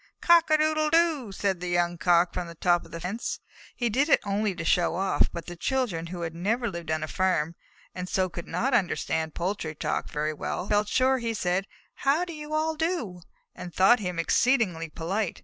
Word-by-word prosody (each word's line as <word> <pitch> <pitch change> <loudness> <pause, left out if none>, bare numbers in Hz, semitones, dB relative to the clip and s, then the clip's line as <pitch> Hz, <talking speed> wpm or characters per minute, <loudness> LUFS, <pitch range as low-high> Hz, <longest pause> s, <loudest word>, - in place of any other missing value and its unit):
"Cock 340 -1 +5
a 310 - +5
doodle 310 0 +2
doo!" 320 -8 +2
said 195 -2 -1
the 180 - -5
young 175 0 +1
Cock 175 0 +3
from 180 -1 -3
the 170 - -10
top 175 +1 +2
rail - - -14
of - - -20
the 165 - -6
fence. 190 +7 -4 0.4
He 240 - 0
did 265 +7 +1
it - - +6
only 200 -1 -1
to 170 -2 -5
show 170 -1 +2
off, 190 +2 +2
but 170 -2 -6
the 175 - -7
children, 195 -5 -1
who 175 0 -6
had 165 -1 -3
never 220 +8 -1
lived 170 -5 -6
on 155 0 0
a - - -3
farm, 170 -3 0 0.4
and 180 0 -5
so 185 -1 +1
could 170 -1 -8
not 265 +2 -1
understand 160 -7 0
poultry 170 -3 -3
talk - - -2
very 150 +1 -2
well, 180 +4 -4
felt 210 0 +2
sure 260 +3 +2
that 235 - -3
he 225 - -1
said, 185 0 0 0.3
"How 290 +6 +2
do 345 - -7
you 300 -1 -8
all 315 +1 +1
do?" 305 - -2 0.3
and 175 -1 -9
thought 215 +6 +6
him 180 -4 -4
exceedingly 180 -3 +2
polite. 185 +5 -3
190 Hz, 220 wpm, -27 LUFS, 170-250 Hz, 0.4 s, it